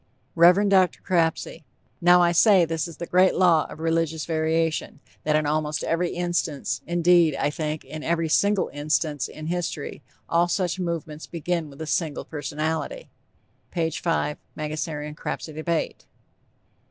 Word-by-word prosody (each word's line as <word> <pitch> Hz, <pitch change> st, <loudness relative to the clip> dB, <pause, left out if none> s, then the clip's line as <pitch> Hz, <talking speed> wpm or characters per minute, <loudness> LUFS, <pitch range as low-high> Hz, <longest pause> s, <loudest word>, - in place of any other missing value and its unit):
REV. 180 Hz, +4 st, +6 dB
DR. 190 Hz, -2 st, +5 dB, 0.2 s
CRAPSEY: 165 Hz, -4 st, 0 dB, 0.4 s
"Now, 175 Hz, +1 st, +6 dB
I 170 Hz, -, +4 dB
say 185 Hz, 0 st, +5 dB
this 165 Hz, 0 st, -2 dB
is 165 Hz, -3 st, -11 dB
the 170 Hz, -, -5 dB
great 185 Hz, +2 st, +3 dB
law 170 Hz, -4 st, +4 dB
of -, -, -10 dB
religious 165 Hz, -1 st, 0 dB
variation, 160 Hz, -1 st, -1 dB, 0.3 s
that 150 Hz, 0 st, +2 dB
in 155 Hz, 0 st, +2 dB
almost 150 Hz, 0 st, -1 dB
every 170 Hz, +1 st, 0 dB
instance, 175 Hz, -4 st, -2 dB
indeed, 170 Hz, -2 st, +4 dB
I 145 Hz, +2 st, 0 dB
think, 155 Hz, 0 st, -4 dB
in 155 Hz, -, -7 dB
every 165 Hz, +1 st, 0 dB
single 200 Hz, +5 st, +2 dB
instance 145 Hz, -1 st, -1 dB
in 155 Hz, -, -9 dB
history, 170 Hz, -2 st, -3 dB, 0.3 s
all 170 Hz, +1 st, +2 dB
such 180 Hz, 0 st, -1 dB
movements 165 Hz, -3 st, -4 dB
begin 170 Hz, -1 st, -2 dB
with 140 Hz, +2 st, -12 dB
a -, -, -5 dB
single 155 Hz, -1 st, -2 dB
personality." 160 Hz, -, -4 dB, 0.6 s
(P. 165 Hz, -2 st, -1 dB
5, 155 Hz, -2 st, -1 dB, 0.2 s
_Mangasarian 150 Hz, 0 st, -4 dB
Crapsey 155 Hz, 0 st, -5 dB
Debate. 160 Hz, +1 st, -3 dB
165 Hz, 145 wpm, -24 LUFS, 155-175 Hz, 0.6 s, REV